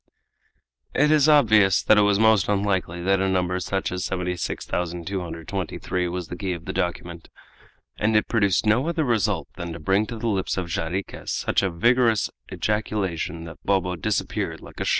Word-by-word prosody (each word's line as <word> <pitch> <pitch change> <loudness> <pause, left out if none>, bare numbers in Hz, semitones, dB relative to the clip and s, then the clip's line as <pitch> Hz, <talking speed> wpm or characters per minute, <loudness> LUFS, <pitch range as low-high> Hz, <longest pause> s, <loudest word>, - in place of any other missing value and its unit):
It 150 +2 +4
is 155 -1 +5
obvious 110 -10 +5
that 110 - +5
it - - +6
was 100 -1 +3
most 110 -2 +4
unlikely 95 -4 0
that 95 +1 +2
a 95 0 +1
number 90 -1 0
such 95 +2 -2
as 90 0 -3
76223 90 -1 -3
was 90 -1 -4
the 90 - -6
key 95 0 -3
of 85 -1 -8
the - - -4
document, 85 -1 -3 0.7
and 110 +1 +1
it 105 - +3
produced 100 -4 +2
no 115 +7 +3
other 170 -2 0
result 120 -6 0
than 85 -1 -5
to 80 - -8
bring 95 +6 +1
to 115 - -6
the 115 - -6
lips 95 -4 -1
of 90 - -1
Jarriquez 85 +3 -4
such - - +1
a 95 - 0
vigorous 115 +5 +2 0.2
ejaculation 95 -6 -2
that 85 0 -10
Bobo 95 -2 +1
disappeared 85 - -2
like - - -13
a - - -2
shot! - - 0
95 Hz, 175 wpm, -24 LUFS, 90-110 Hz, 0.7 s, it